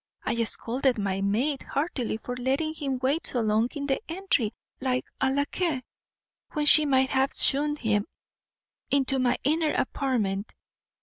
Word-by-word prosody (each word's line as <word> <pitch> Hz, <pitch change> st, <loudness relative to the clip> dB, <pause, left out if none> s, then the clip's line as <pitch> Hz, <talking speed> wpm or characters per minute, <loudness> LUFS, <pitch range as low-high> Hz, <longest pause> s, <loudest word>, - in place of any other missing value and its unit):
I 235 Hz, 0 st, 0 dB
scolded 250 Hz, +3 st, 0 dB
my 195 Hz, -2 st, -1 dB
maid 245 Hz, +9 st, 0 dB
heartily 275 Hz, -7 st, -2 dB
for 245 Hz, +3 st, -6 dB
letting 270 Hz, +5 st, -1 dB
him 280 Hz, -4 st, -3 dB
wait 285 Hz, +5 st, +1 dB
so 245 Hz, -, -1 dB
long 220 Hz, +2 st, +2 dB
in 285 Hz, -1 st, -3 dB
the 270 Hz, -1 st, 0 dB
entry 330 Hz, -, 0 dB, 0.3 s
like 255 Hz, -1 st, -1 dB
a 265 Hz, -, +2 dB
lacquais, 285 Hz, +1 st, -1 dB, 0.7 s
when 300 Hz, -2 st, 0 dB
she 300 Hz, 0 st, +7 dB
might 265 Hz, -1 st, +3 dB
have 270 Hz, 0 st, +2 dB
shewn 295 Hz, +2 st, +4 dB
him 215 Hz, -6 st, 0 dB, 0.8 s
into 270 Hz, -1 st, +2 dB
my 250 Hz, -1 st, +2 dB
inner 310 Hz, +2 st, +1 dB
apartment." 225 Hz, -8 st, -1 dB
265 Hz, 145 wpm, -27 LUFS, 235-290 Hz, 0.8 s, she